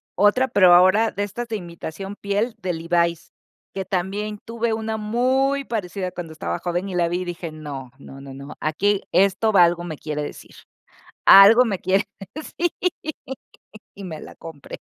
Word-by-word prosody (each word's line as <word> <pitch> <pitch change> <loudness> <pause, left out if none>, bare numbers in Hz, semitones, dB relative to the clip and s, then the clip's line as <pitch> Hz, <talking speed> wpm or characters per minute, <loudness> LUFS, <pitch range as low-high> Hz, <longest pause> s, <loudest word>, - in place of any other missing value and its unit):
Otra, 230 +6 +3
pero 185 -7 +5
ahora 185 +5 +5
de 205 - -3
estas 215 +4 -5
de 225 - -3
imitación 175 +2 -8
piel 205 +4 -2
de 185 -1 -2
Levi's, 170 0 -1 0.4
que 195 -1 -4
también 200 +3 -3
tuve 230 0 -2
una 220 0 -3
muy 260 +6 +1
parecida 195 -5 -4
cuando 175 -2 -7
estaba 160 +2 -4
joven 175 +2 -2
y 185 - -5
la 175 -1 +2
vi, 175 +2 -2
dije 175 -1 -6
no, 145 -5 -8
no, 135 -1 -12
no, 135 0 -10
no. 140 +2 -9
Aquí 195 +6 0
esto 195 +4 +3
va 195 -4 +6
algo 175 0 +1
me 160 -3 -6
quiere 150 0 -4
decir. 145 - -8 0.8
Algo 210 +6 +9
me 200 -4 -2
quiere 190 +3 +1 0.3
decir. 330 +3 -3 1.2
Y 200 - -10
me 160 -4 -7
la - - -11
compré. 160 -4 -10
190 Hz, 170 wpm, -22 LUFS, 170-215 Hz, 1.2 s, Algo